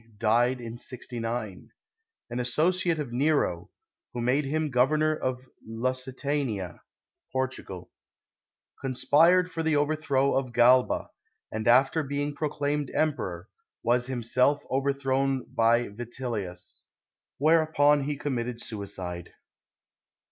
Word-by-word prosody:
died 120 +3 +2
in 120 0 -7
69; 115 -5 -5 0.6
an 120 - -2
associate 165 +7 +1
of 140 -6 -4
Nero, 125 - +1 0.4
who 120 - -4
made 130 +5 +1
him 155 +1 -1
Got 125 +1 +4
«)rnor 155 0 +2
of 130 0 -3 0.2
Lusitania 130 -3 -3 0.5
(Portugal); 130 -8 -4 0.9
conspired 165 +7 +3
for 165 - -3
the 160 -1 +1
overthrow 145 -2 +1
of 130 -2 -1
Oalba, 125 +1 +4 0.4
and 110 +1 -3
after 135 +6 +5
being 145 0 -2
proclaimed 145 -1 -2
Emperor, 95 - -1 0.4
was 120 +1 +2
himself 130 +3 +1
overthrown 135 -1 0
by 115 +1 +3
Vitellius, 110 -5 -6 0.5
whereupon 150 -2 +4
he 145 0 -2
conmiitted 125 -4 -3
suicide. 95 -6 -6
130 Hz, 105 wpm, -27 LUFS, 120-145 Hz, 0.9 s, after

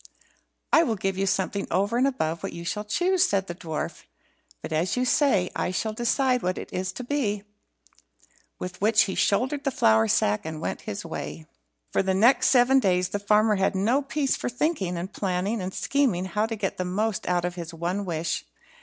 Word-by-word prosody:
"I 320 - +8
will 235 -9 +1
give 195 -1 -2
you 195 +1 -1
something 195 +1 -1
over 200 +6 +1
and 255 +3 +3
above 165 -12 -2
what - - -5
you 170 0 -7
shall 210 +4 -2
choose," 360 - +2
said 195 - +1
the 175 - -5
dwarf; 160 -3 -5 0.6
"but, - - -5
as 170 +9 0
you 250 - +1
say, 245 -10 +2
I - - -1
shall 215 +4 -2
decide 250 +2 +1
what 185 +1 -1
it - - -8
is 185 +1 -2
to 220 - -6
be." 235 -7 -1 1.1
With 180 0 -7
which 215 +1 +5
he 190 - -3
shouldered 260 +8 +1
the - - +1
flour 110 - +3
sack, 105 0 +2
and 160 -1 -5
went - - -4
his - - -5
way. 75 +2 -6 0.5
For - - +2
the 190 -1 0
next 235 +7 +5
seven 260 +1 +5
days, 180 -5 +1
the 205 - -2
farmer 210 +1 +3
had 190 +1 +1
no 225 +9 +2
peace 280 0 0
for - - -3
thinking, 245 - -1
and 185 +4 -5
planning, 195 +3 -1
and 185 +1 -4
scheming 235 -8 0
how 210 +4 0
to 225 - -3
get 200 -3 -3
the 185 - -1
most 205 +3 -1
out 175 -1 +1
of 180 - -2
his 170 -2 -7
one 175 +4 -2
wish. 165 -3 -2
195 Hz, 205 wpm, -26 LUFS, 180-240 Hz, 1.1 s, I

